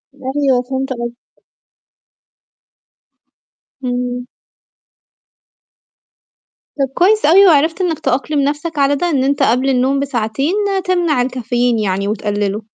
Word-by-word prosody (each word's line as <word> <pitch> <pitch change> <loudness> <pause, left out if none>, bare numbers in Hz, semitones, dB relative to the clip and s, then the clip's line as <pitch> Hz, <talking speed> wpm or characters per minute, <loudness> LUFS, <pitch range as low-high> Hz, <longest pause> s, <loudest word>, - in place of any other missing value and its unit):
أيوه، 265 -1 0
فهمت 265 +2 -4
قصدك. 240 0 -5 2.7
امم. 245 0 -3 2.5
طَب 270 -2 0
كويس 415 +3 +3
أوي 375 +6 +6
وعرفت 320 +2 +3
إنك 335 -4 -1
تأقلم 275 +4 -1
نفسك 295 +3 -2
على 280 +1 +3
ده، 350 +4 -1
إن 270 -4 +1
أنت 280 +1 +1
قبل 255 +4 +2
النوم 265 +2 +1
بساعتين 270 - -1 0.3
تمنع 345 -8 +1
الكافيين 245 -2 -1
يعني 200 -1 -1
وتقلله. 205 0 -2
265 Hz, 105 wpm, -16 LUFS, 245-295 Hz, 2.7 s, أوي